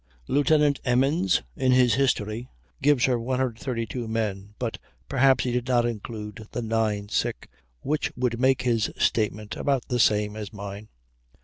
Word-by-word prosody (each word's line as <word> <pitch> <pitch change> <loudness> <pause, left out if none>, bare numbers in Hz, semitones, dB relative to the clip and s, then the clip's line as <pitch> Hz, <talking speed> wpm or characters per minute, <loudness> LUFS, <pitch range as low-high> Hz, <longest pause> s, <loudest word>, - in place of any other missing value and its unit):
Lieutenant 145 0 +3
Emmons 130 - +2
in 130 -1 +2
his 125 -3 +5
"History," 120 -2 0 0.3
gives 145 -4 +4
her 125 -2 +1
132 125 -1 -2
men; 105 -2 -3
but 120 -3 -3 0.3
perhaps 135 0 +3
he 125 - -1
did 125 0 -1
not 120 -2 +3
include 110 -1 -6
the 120 - -2
nine 110 -2 0
sick, 105 - -2 0.3
which 150 +2 -1
would 120 -1 -1
make 130 0 +3
his 115 -4 +1
statement 105 -1 0
about 135 -3 -1
the 125 - 0
same 105 -1 +3
as 105 -2 -6
mine. 100 0 -8
120 Hz, 145 wpm, -26 LUFS, 105-130 Hz, 0.3 s, his